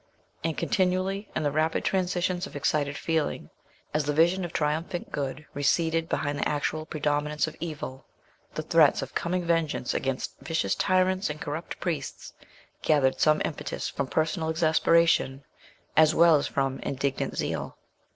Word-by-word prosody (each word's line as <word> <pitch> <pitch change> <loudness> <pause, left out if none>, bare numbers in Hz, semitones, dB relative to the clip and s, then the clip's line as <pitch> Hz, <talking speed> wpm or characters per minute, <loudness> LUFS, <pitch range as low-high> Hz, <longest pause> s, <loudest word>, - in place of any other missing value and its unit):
And 165 -1 -1
continually, 190 0 0
in 155 - 0
the 145 - +1
rapid 155 +2 0
transitions 180 0 0
of - - -14
excited 145 0 0
feeling, 160 -2 -1 0.4
as 150 -1 +1
the 150 - 0
vision 175 +5 +3
of 175 - -4
triumphant 160 +3 -2
good 140 +1 -4
receded 165 +3 +1
behind 145 0 -1
the - - +1
actual 155 +1 -2
predominance 150 0 0
of 155 - -7
evil, 150 -5 -6 0.5
the - - -2
threats - - +4
of - - -8
coming 180 +1 -1
vengeance 165 -6 0
against 135 -1 -3
vicious 160 +1 -1
tyrants 185 0 +2
and 150 0 -5
corrupt 150 +4 -5
priests 160 -7 -4 0.5
gathered 140 -4 +2
some 155 0 +4
impetus 150 - -4
from 140 - -3
personal 160 +3 0
exasperation, 160 -3 +3 0.5
as 155 0 +5
well 170 -1 +7
as 140 - -1
from 135 -1 -1
indignant 135 0 -2
zeal. - - -3
155 Hz, 150 wpm, -27 LUFS, 145-170 Hz, 0.5 s, well